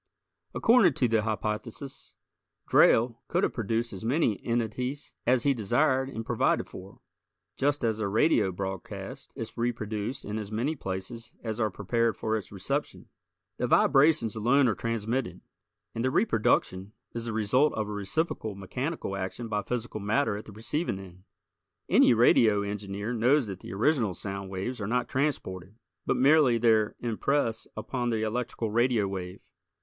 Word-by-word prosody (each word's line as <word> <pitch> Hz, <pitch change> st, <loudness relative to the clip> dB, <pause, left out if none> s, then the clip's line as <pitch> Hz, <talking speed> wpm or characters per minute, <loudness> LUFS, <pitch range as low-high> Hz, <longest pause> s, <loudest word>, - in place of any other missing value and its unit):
According 225 Hz, -, +5 dB
to 125 Hz, -, +2 dB
the 115 Hz, -1 st, +2 dB
hypothesis, 110 Hz, +5 st, -4 dB, 0.5 s
Drayle 115 Hz, 0 st, +4 dB
could -, -, 0 dB
have -, -, +1 dB
produced 115 Hz, +1 st, -1 dB
as 95 Hz, -, -7 dB
many 115 Hz, -, +1 dB
entities 120 Hz, +4 st, -2 dB
as 125 Hz, 0 st, +4 dB
he 140 Hz, -, +3 dB
desired 130 Hz, +4 st, +1 dB
and 115 Hz, -4 st, -6 dB
provided -, -, +1 dB
for, 100 Hz, +6 st, -12 dB, 0.5 s
just 145 Hz, 0 st, +1 dB
as 110 Hz, -2 st, 0 dB
a 110 Hz, -, 0 dB
radio 105 Hz, -1 st, +3 dB
broadcast 95 Hz, -, -6 dB
is 115 Hz, -5 st, -6 dB
reproduced 115 Hz, +1 st, -3 dB
in 105 Hz, +2 st, -3 dB
as 105 Hz, -1 st, -7 dB
many 125 Hz, +9 st, -1 dB
places 110 Hz, +1 st, -6 dB
as 110 Hz, -1 st, -3 dB
are 110 Hz, -2 st, +2 dB
prepared 115 Hz, +4 st, 0 dB
for 110 Hz, 0 st, -1 dB
its 105 Hz, -4 st, -5 dB
reception. -, -, -4 dB, 0.5 s
The -, -, -1 dB
vibrations 135 Hz, -5 st, +4 dB
alone 125 Hz, +5 st, +3 dB
are 110 Hz, -, +2 dB
transmitted, 115 Hz, +4 st, -2 dB, 0.5 s
and 115 Hz, -, -3 dB
the 130 Hz, -, +2 dB
reproduction 105 Hz, -, +1 dB, 0.2 s
is 115 Hz, 0 st, -4 dB
the 115 Hz, -, -3 dB
result 115 Hz, +7 st, +3 dB
of 110 Hz, -1 st, -2 dB
a -, -, -5 dB
reciprocal 105 Hz, -, -2 dB
mechanical 125 Hz, -, -4 dB
action 95 Hz, +5 st, -5 dB
by 105 Hz, -1 st, 0 dB
physical 120 Hz, -1 st, -4 dB
matter 110 Hz, +2 st, +1 dB
at 105 Hz, -, -7 dB
the -, -, -11 dB
receiving 115 Hz, -, -2 dB
end. 95 Hz, -1 st, -12 dB, 0.6 s
Any 120 Hz, -, +5 dB
radio 110 Hz, -3 st, +5 dB
engineer 100 Hz, +2 st, -4 dB
knows 125 Hz, +4 st, +3 dB
that 95 Hz, -3 st, -6 dB
the -, -, -9 dB
original 110 Hz, -, +1 dB
sound 100 Hz, +1 st, -5 dB
waves 100 Hz, +6 st, -4 dB
are 100 Hz, -, -2 dB
not 125 Hz, +3 st, 0 dB
transported, 105 Hz, -9 st, -2 dB, 0.3 s
but -, -, +2 dB
merely 140 Hz, -3 st, +5 dB
their 110 Hz, -2 st, +3 dB
impress 120 Hz, 0 st, -1 dB
upon 120 Hz, +2 st, -2 dB
the 110 Hz, -2 st, 0 dB
electrical 115 Hz, 0 st, -2 dB
radio 120 Hz, -2 st, +2 dB
wave. 95 Hz, -2 st, -6 dB
115 Hz, 155 wpm, -28 LUFS, 105-125 Hz, 0.6 s, According